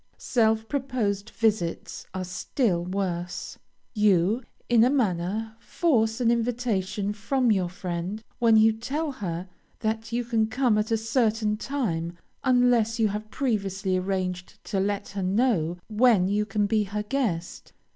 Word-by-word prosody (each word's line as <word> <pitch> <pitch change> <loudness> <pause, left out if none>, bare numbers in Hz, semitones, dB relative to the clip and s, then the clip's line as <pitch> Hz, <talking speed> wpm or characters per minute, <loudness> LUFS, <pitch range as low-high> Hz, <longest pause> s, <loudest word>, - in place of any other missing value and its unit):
Self 220 -2 +1
proposed 235 -7 -1
visits 210 -7 -1
are 185 - -4
still 180 0 -1
worse. 180 -1 -3 0.3
You, 210 +1 +3 0.3
in 235 -2 +5
a 245 - +5
manner, 220 -3 0
force 225 -8 +1
an 235 -2 +3
invitation 220 -4 -1
from 235 +4 +1
your 185 -4 +1
friend 180 +3 -4 0.2
when 230 -2 +5
you 220 0 +6
tell 285 +8 -3
her 180 -7 -4 0.3
that 220 +1 -2
you 240 +1 0
can 225 -2 +1
come 230 -1 +2
at 210 - -1
a 225 - +2
certain 225 -2 +1
time, 175 -10 -2 0.3
unless 245 -3 +3
you 220 -2 +3
have 210 +1 -5
previously 195 -7 -1
arranged 185 -1 -2
to 200 - -2
let 200 +1 -1
her 200 -1 -4
know 185 -4 +1
when 220 -4 +4
you 210 +2 0
can 205 0 +1
be 210 0 +1
her 210 +2 -3
guest. 210 -8 -2
215 Hz, 145 wpm, -26 LUFS, 190-235 Hz, 0.3 s, you